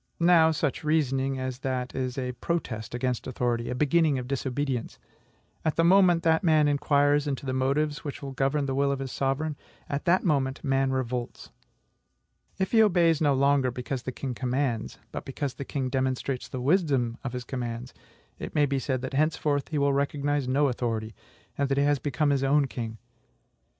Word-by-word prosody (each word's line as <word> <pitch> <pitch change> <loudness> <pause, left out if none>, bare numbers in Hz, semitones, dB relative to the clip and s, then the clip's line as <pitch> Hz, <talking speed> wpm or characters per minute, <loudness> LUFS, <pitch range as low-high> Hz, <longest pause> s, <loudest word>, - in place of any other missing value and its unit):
Now, 170 -2 +6
such 155 -3 -1
reasoning 135 -3 +1
as 130 -1 -4
that 130 -1 -3
is 130 -1 -3
a 125 -1 -2
protest 120 -7 -3
against 125 -1 -2
authority, 120 -2 -1
a 125 - -2
beginning 150 +1 +3
of 125 -1 -5
disobedience. 135 -2 -2 0.7
At 160 - 0
the 165 - +3
moment 175 -1 +5
that 160 +1 +3
man 155 -3 +4
inquires 145 0 +2
into 140 -1 -3
the 130 - -2
motives 145 +3 0
which 145 -3 -5 0.2
govern 140 +2 +1
the 135 - -2
will 140 +1 +2
of 140 - -1
his 135 -1 -5
sovereign, 140 +3 -1 0.3
at 140 +4 -3
that 180 +1 +3
moment 140 -5 0
man 135 -1 +1
revolts. 125 -2 -3 1.1
If 190 -1 -1
he 225 - +6
obeys 170 -6 +4
no 145 -3 +3
longer 140 -1 +3
because 125 +1 -4
the 130 - -4
king 130 0 -5
commands, 125 -2 -2
but - - -5
because 135 0 -4
the 140 - -7
king 135 -1 -2
demonstrates 130 0 -2
the 130 - -5
wisdom 135 -6 +1
of 135 -2 -4
his 125 -1 -4
commands, 120 0 -5 0.5
it - - -7
may 150 - +4
be 140 -1 -1
said 130 -1 -2
that 130 - -4
henceforth 150 -1 +1
he 155 - -3
will 140 -1 +2
recognize 140 0 0
no 140 +3 +3
authority, 115 -3 -2 0.5
and 140 -1 +1
that 135 - +1
he 140 - +3
has 145 -1 +2
become 145 +2 0
his 135 -1 +1
own 140 +1 +3
king. 115 -4 -5
135 Hz, 185 wpm, -27 LUFS, 130-150 Hz, 1.1 s, Now